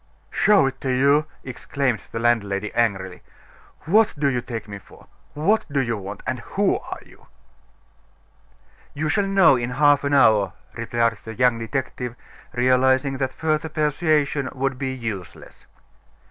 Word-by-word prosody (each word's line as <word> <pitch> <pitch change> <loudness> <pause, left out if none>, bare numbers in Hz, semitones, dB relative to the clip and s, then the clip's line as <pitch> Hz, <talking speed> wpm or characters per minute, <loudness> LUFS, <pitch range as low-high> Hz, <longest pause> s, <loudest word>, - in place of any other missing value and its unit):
"Show 205 -8 +4
it 135 0 -4
to 135 - -2
you!" 140 +4 +3 0.2
exclaimed 130 -1 -2
the - - -5
landlady, 105 -3 0
angrily. 95 -6 -1 0.6
"What 210 +6 +3
do 145 0 +1
you 125 -2 -1
take 115 -3 -6
me 100 -1 -8
for? - - -18 0.3
What 200 +9 +2
do 140 - +1
you 120 -3 0
want? 100 0 -8
and - - -2
who - - 0
are - - -8
you?" - - -20 1.7
"You 155 +2 -2
shall 195 +6 +1
know 195 -7 +5
in 120 0 -3
half 145 +2 +3
an 140 0 +1
hour," 110 -7 +4 0.2
replied 115 -1 -1
the 110 0 -8
young 125 -1 +2
detective, 125 0 -4 0.4
realizing 130 +2 +2
that 130 -1 -1
further 155 +2 -1
persuasion 150 -2 0
would 135 0 -2
be 135 -1 -2
useless. 110 -8 -7
130 Hz, 145 wpm, -22 LUFS, 115-145 Hz, 1.7 s, know